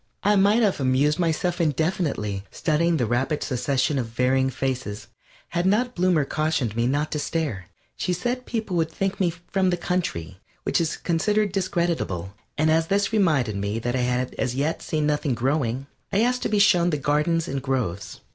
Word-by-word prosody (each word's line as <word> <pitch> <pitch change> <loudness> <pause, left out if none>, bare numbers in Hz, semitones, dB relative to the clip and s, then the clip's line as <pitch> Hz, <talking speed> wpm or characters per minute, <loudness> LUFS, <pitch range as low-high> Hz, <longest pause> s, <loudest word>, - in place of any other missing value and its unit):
I 205 +1 +4
might 205 +4 +4
have 200 -7 +2
amused 140 +4 +2
myself 175 +1 0
indefinitely, 150 - -1
studying 165 +2 +1
the 125 - +1
rapid 130 +6 0
succession 135 +2 0
of 120 - -2
varying 130 +3 +1
faces, 125 -7 -3 0.4
had 175 +2 0
not 245 +6 +2
Bloomer 175 -5 +2
cautioned 155 -8 -1
me 120 +1 +1
not 145 +4 0
to 150 - -1
stare. 145 - -2 0.3
She - - -1
said 245 +8 -2
people 220 -5 -2
would 160 -1 +1
think 195 +3 -2
me 185 -3 +3
from 180 +2 -1
the 175 - +1
country, 95 - -3 0.2
which - - +1
is 160 - -1
considered 205 +5 +1
discreditable, 170 - -1 0.2
and 155 +1 +3
as 160 0 +2
this 200 +3 +1
reminded 150 - +2
me 100 +2 -2
that 120 +2 -2
I - - +1
had 125 +1 0
as 125 -2 -1
yet 145 +4 -1
seen 155 -1 -1
nothing 150 -3 0
growing, 130 0 0 0.3
I 200 - +2
asked 250 +1 +1
to - - -1
be 210 - +1
shown 180 -4 +5
the 150 - 0
gardens 150 +4 +1
and 135 0 -3
groves. 100 -9 -3
155 Hz, 185 wpm, -24 LUFS, 125-180 Hz, 0.4 s, shown